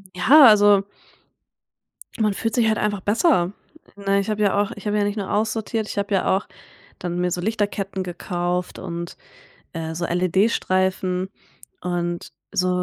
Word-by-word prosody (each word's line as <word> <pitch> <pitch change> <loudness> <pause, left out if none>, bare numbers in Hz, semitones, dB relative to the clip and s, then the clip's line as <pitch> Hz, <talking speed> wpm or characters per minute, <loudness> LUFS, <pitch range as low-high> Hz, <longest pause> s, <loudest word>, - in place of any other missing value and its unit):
Ja, 275 +12 +7
also 205 -2 +6 1.4
man 210 -2 +2
fühlt 225 +3 -2
sich 235 -3 +3
halt 220 0 +2
einfach 205 -2 -1
besser, 205 - +2 0.4
ne? 200 0 +1
Ich 200 - -3
habe 210 0 -1
ja 205 0 +3
auch 205 - -2
ich 205 +1 -8
habe 210 0 +1
ja 205 - +2
nicht 205 +1 -2
nur 200 -2 -3
aussortiert, 220 0 -1
ich - - -7
habe 200 0 -1
ja 190 0 +2
auch 195 - -3 0.5
dann 175 0 -4
mir 180 0 0
so 175 - -2
Lichterketten 200 -1 -2
gekauft 175 0 -3
und, 170 -1 -6 0.6
äh, 160 -1 -5
so 170 +1 -3
LED-Streifen 185 0 +1 0.5
und 175 -1 -3 0.2
so, 185 - +1
195 Hz, 160 wpm, -22 LUFS, 180-210 Hz, 1.4 s, Ja